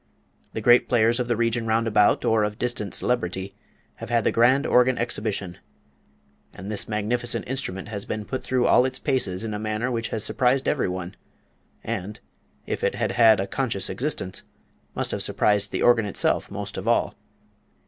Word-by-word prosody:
The -, -, -4 dB
great 120 Hz, 0 st, +5 dB
players 120 Hz, 0 st, +3 dB
of 125 Hz, -, -1 dB
the 120 Hz, -, +1 dB
region 115 Hz, 0 st, 0 dB
round 110 Hz, +1 st, +1 dB
about, 105 Hz, -2 st, +3 dB
or 110 Hz, -1 st, +3 dB
of 105 Hz, 0 st, -2 dB
distant 120 Hz, -4 st, -3 dB
celebrity, 95 Hz, -5 st, -2 dB, 0.4 s
have -, -, -8 dB
had 120 Hz, -2 st, +2 dB
the -, -, +2 dB
grand 130 Hz, +4 st, +3 dB
organ 125 Hz, 0 st, +3 dB
exhibition; 105 Hz, -6 st, -3 dB, 1.0 s
and 100 Hz, +3 st, -7 dB
this 105 Hz, -, -2 dB
magnificent 115 Hz, +3 st, -2 dB
instrument 115 Hz, -6 st, -4 dB
has 100 Hz, -2 st, -5 dB
been 110 Hz, 0 st, -5 dB
put 130 Hz, -, -4 dB
through 130 Hz, -1 st, 0 dB
all -, -, +5 dB
its 130 Hz, 0 st, -1 dB
paces 110 Hz, -10 st, -1 dB
in 110 Hz, -1 st, -4 dB
a 105 Hz, -, -3 dB
manner 110 Hz, +3 st, -2 dB
which 115 Hz, -1 st, -2 dB
has 110 Hz, -, -3 dB
surprised 130 Hz, +1 st, +1 dB
every 140 Hz, -10 st, +1 dB
one, 90 Hz, +1 st, -5 dB, 0.7 s
and, 100 Hz, +3 st, -5 dB, 0.5 s
if -, -, -4 dB
it -, -, +1 dB
had -, -, -1 dB
had 110 Hz, -4 st, +5 dB
a 95 Hz, -, 0 dB
conscious 105 Hz, -3 st, -1 dB
existence, 95 Hz, -3 st, -3 dB, 0.5 s
must -, -, -1 dB
have -, -, -2 dB
surprised 105 Hz, -1 st, +1 dB
the -, -, -2 dB
organ 120 Hz, -3 st, +4 dB
itself 100 Hz, -, 0 dB
most -, -, -6 dB
of -, -, -7 dB
all. -, -, +2 dB
115 Hz, 180 wpm, -24 LUFS, 105-125 Hz, 1.0 s, great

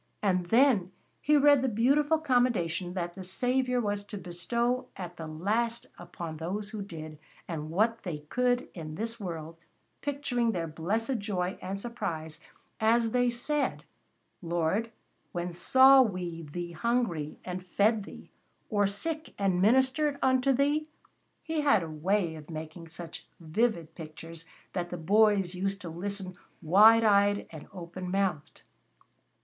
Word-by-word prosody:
And 185 Hz, -3 st, +1 dB
then 225 Hz, -5 st, +4 dB, 0.3 s
he 300 Hz, +1 st, +4 dB
read 285 Hz, -1 st, +6 dB
the 265 Hz, -, +1 dB
beautiful 280 Hz, +8 st, +3 dB
commendation 235 Hz, -, +1 dB
that 175 Hz, -1 st, -3 dB
the 190 Hz, -, -9 dB
Saviour 250 Hz, +7 st, 0 dB
was 205 Hz, -3 st, -1 dB
to 205 Hz, -, -7 dB
bestow 235 Hz, +8 st, -1 dB
at 180 Hz, -2 st, -6 dB
the 160 Hz, -, -6 dB
last 215 Hz, +9 st, -1 dB
upon 170 Hz, -2 st, -7 dB
those 200 Hz, +6 st, -4 dB
who 215 Hz, -, -5 dB
did 155 Hz, -5 st, -8 dB, 0.3 s
what 175 Hz, +8 st, 0 dB
they 175 Hz, -8 st, -4 dB
could 245 Hz, +10 st, 0 dB
in 155 Hz, -3 st, -7 dB
this 230 Hz, +4 st, -4 dB
world, 165 Hz, -4 st, -6 dB, 0.4 s
picturing 260 Hz, -5 st, 0 dB
their 170 Hz, -3 st, -2 dB
blessed 215 Hz, -, -1 dB
joy 190 Hz, -2 st, -2 dB
and 195 Hz, +2 st, -4 dB
surprise 160 Hz, -9 st, -4 dB, 0.4 s
as 225 Hz, +1 st, +3 dB
they 245 Hz, 0 st, +3 dB
said: 280 Hz, +5 st, -1 dB, 0.6 s
"Lord, 175 Hz, +6 st, 0 dB, 0.4 s
when 175 Hz, 0 st, -3 dB
saw 265 Hz, +9 st, +7 dB
we 180 Hz, -7 st, -2 dB
Thee 175 Hz, +1 st, -5 dB
hungry 175 Hz, -6 st, -1 dB
and 180 Hz, 0 st, -5 dB
fed 210 Hz, +4 st, +2 dB
Thee, -, -, -12 dB, 0.4 s
or 205 Hz, -2 st, +3 dB
sick 310 Hz, +11 st, -4 dB
and 190 Hz, -3 st, +1 dB
ministered 265 Hz, +7 st, +3 dB
unto 260 Hz, +1 st, +3 dB
Thee?" 290 Hz, +4 st, +1 dB, 0.6 s
He 320 Hz, -1 st, -1 dB
had 280 Hz, -11 st, +4 dB
a -, -, -5 dB
way 170 Hz, +2 st, 0 dB
of 155 Hz, -1 st, -11 dB
making 160 Hz, +1 st, -7 dB
such 165 Hz, 0 st, -9 dB
vivid 170 Hz, -1 st, -1 dB
pictures 165 Hz, 0 st, -10 dB, 0.3 s
that 175 Hz, -2 st, -2 dB
the 180 Hz, -, -5 dB
boys 200 Hz, +1 st, +3 dB
used 195 Hz, +2 st, -2 dB
to 170 Hz, -, -6 dB
listen 185 Hz, +2 st, -5 dB, 0.2 s
wide 215 Hz, +7 st, +7 dB
eyed 205 Hz, -1 st, +4 dB
and 155 Hz, -2 st, -10 dB
open 180 Hz, 0 st, -7 dB
mouthed. 185 Hz, -6 st, -2 dB
195 Hz, 145 wpm, -29 LUFS, 170-235 Hz, 0.6 s, saw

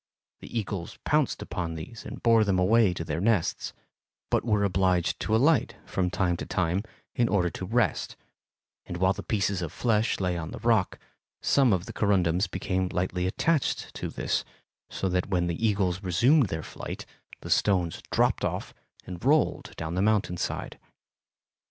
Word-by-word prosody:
The -, -, -7 dB
eagles 95 Hz, -4 st, -5 dB
pounced 150 Hz, -3 st, +1 dB
upon 85 Hz, -4 st, -4 dB
these 80 Hz, +8 st, -8 dB
and -, -, -8 dB
bore 115 Hz, -2 st, +5 dB
them 100 Hz, -3 st, +1 dB
away 105 Hz, +2 st, +4 dB
to 85 Hz, -2 st, -4 dB
their 80 Hz, 0 st, -3 dB
nests, 105 Hz, -5 st, +1 dB, 0.6 s
but -, -, +2 dB
were 105 Hz, -3 st, +2 dB
obliged 90 Hz, -2 st, +1 dB
to 110 Hz, -, 0 dB
alight 140 Hz, +3 st, +3 dB
from 90 Hz, -1 st, -1 dB
time 90 Hz, -2 st, 0 dB
to -, -, -5 dB
time 90 Hz, +1 st, 0 dB, 0.3 s
in 120 Hz, -1 st, +1 dB
order 90 Hz, -4 st, +2 dB
to 95 Hz, -, -6 dB
rest, 115 Hz, +2 st, 0 dB, 0.7 s
and 90 Hz, -, -5 dB
while 95 Hz, +2 st, +3 dB
the -, -, -7 dB
pieces 100 Hz, -3 st, 0 dB
of 85 Hz, -3 st, -4 dB
flesh 115 Hz, -2 st, +1 dB
lay 90 Hz, -2 st, 0 dB
on 80 Hz, -1 st, -5 dB
the -, -, -7 dB
rock, 115 Hz, -5 st, +2 dB, 0.4 s
some 135 Hz, -4 st, +3 dB
of 90 Hz, -2 st, +1 dB
the -, -, -8 dB
corundums 95 Hz, -3 st, +2 dB
became 95 Hz, 0 st, -1 dB
lightly 90 Hz, 0 st, -1 dB
attached 155 Hz, -, 0 dB
to -, -, -4 dB
this, -, -, -1 dB, 0.5 s
so 95 Hz, -, -2 dB
that 90 Hz, +1 st, 0 dB
when 90 Hz, -2 st, +1 dB
the 85 Hz, +5 st, -3 dB
eagles 95 Hz, -3 st, 0 dB
resumed 120 Hz, -, +4 dB
their 80 Hz, -3 st, -4 dB
flight -, -, -7 dB, 0.4 s
the -, -, -6 dB
stones 90 Hz, -5 st, +2 dB
dropped -, -, +2 dB
off -, -, -3 dB, 0.3 s
and 90 Hz, -1 st, -8 dB
rolled 150 Hz, +4 st, +2 dB
down 80 Hz, 0 st, -4 dB
the 90 Hz, -, 0 dB
mountain 105 Hz, -4 st, +2 dB
side. -, -, -4 dB
95 Hz, 170 wpm, -27 LUFS, 90-110 Hz, 0.7 s, bore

